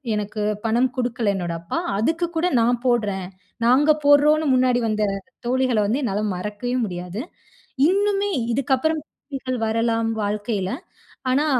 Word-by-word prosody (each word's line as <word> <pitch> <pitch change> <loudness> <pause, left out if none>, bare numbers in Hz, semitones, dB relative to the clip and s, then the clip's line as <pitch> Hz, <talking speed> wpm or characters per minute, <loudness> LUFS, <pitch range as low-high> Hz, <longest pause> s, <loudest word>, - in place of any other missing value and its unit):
எனக்கு 210 +1 -3 0.2
பணம் 240 +3 +2
குடுக்கல, 235 -4 0
என்னோட 175 -3 -3
அப்பா. 170 - -4 0.2
அதுக்கு 325 +9 +1
கூட 350 +3 +2
நான் 240 +1 +2
போடுறேன். 205 -6 +1 0.4
நாங்க 270 +6 +5
போடுறோம்ன்னு 300 +2 +5
முன்னாடி 255 -1 +3
வந்த 215 0 0 0.4
தோழிகள 255 -2 +2
வந்து, 250 +7 0
என்னால 210 -3 -1
மறக்கவே 210 +6 -3
முடியாது. 180 +3 -5 0.7
இன்னுமே 405 +1 +1 0.2
இதுக்கப்பறம் 275 +4 +1
தோழிகள் 260 -3 -5
வரலாம், 230 0 +1 0.2
வாழ்க்கையில. 205 -2 -2 0.6
ஆனா, 285 +4 +2
240 Hz, 125 wpm, -22 LUFS, 210-280 Hz, 0.7 s, நாங்க